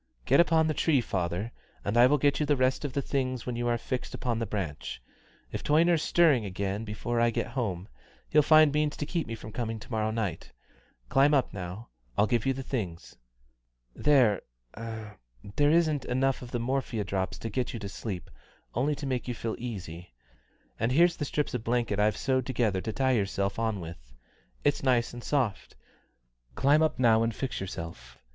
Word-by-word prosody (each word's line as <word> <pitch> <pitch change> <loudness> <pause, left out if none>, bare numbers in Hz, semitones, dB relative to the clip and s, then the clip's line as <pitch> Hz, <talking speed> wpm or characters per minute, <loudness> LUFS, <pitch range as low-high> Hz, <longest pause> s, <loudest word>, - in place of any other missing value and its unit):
"Get - - +4
up 170 -2 +4
on 160 -1 +5
the 155 - +1
tree, 150 -2 +3
father, 95 0 -2 0.3
and 100 - -1
I 120 +1 +7
will 145 +3 +3
give 145 0 +2
you 150 - +1
the 145 - +4
rest 130 +1 +1
of 145 -3 -3
the 140 - -1
things 130 -3 -2
when 125 - -3
you 120 0 -1
are 120 0 +2
fixed 125 +2 -4
on 120 -2 +1
the 115 - -2
branch. 85 -11 -4 0.5
If - - -4
Toyner's 165 +2 +4
stirring 160 -11 +4
again 100 +2 -3
before 115 +2 -2
I 120 - +4
get 115 - -2
home, 100 -8 -3 0.4
he'll 150 - +5
find 155 0 +6
means 150 0 0
to 150 - -2
keep 165 +1 -2
me 115 - -4
from 110 - -10
coming 115 -1 -3
to 105 - -13
morrow 110 -1 0
night. 105 -7 -3 0.6
Climb 145 +2 +5
up 135 - +1
now. 95 +3 -7 0.3
I'll 105 - +5
give 120 +2 0
you 135 - +3
the 135 +1 -5
things. 95 - -4 0.8
There 125 -9 +4 0.3
there 110 -2 -7 0.5
isn't 155 -4 +2
enough 130 +1 +1
of 125 - -8
the 120 - -2
morphia 120 -3 -1
drops 95 -1 -2
to 115 - -5
get 125 +4 -1
you - - -5
to 100 -3 -6
sleep, 100 -2 -6 0.4
only 140 +5 +1
to 145 0 -6
make 130 -2 -2
you 120 - -2
feel 110 0 -3
easy; 90 - -7 0.6
and 115 +2 +1
here's 170 +5 +4
the 145 - -2
strips 150 +1 -2
of 125 -3 -2
blanket 115 -3 0
I've 105 -1 +2
sewed 130 -2 0
together 115 -7 0
to 110 - -3
tie 130 +2 +1
yourself 100 -3 0
on 110 -3 0
with. 65 -8 -10 0.5
It's 145 - +2
nice 125 -4 +2
and 120 0 -8
soft 130 -9 -1 0.8
climb 145 +3 +4
up 160 - +2
now 115 -3 +4
and 115 -1 0
fix 130 -6 -3
yourself. 85 -3 -7
120 Hz, 195 wpm, -29 LUFS, 105-135 Hz, 0.8 s, I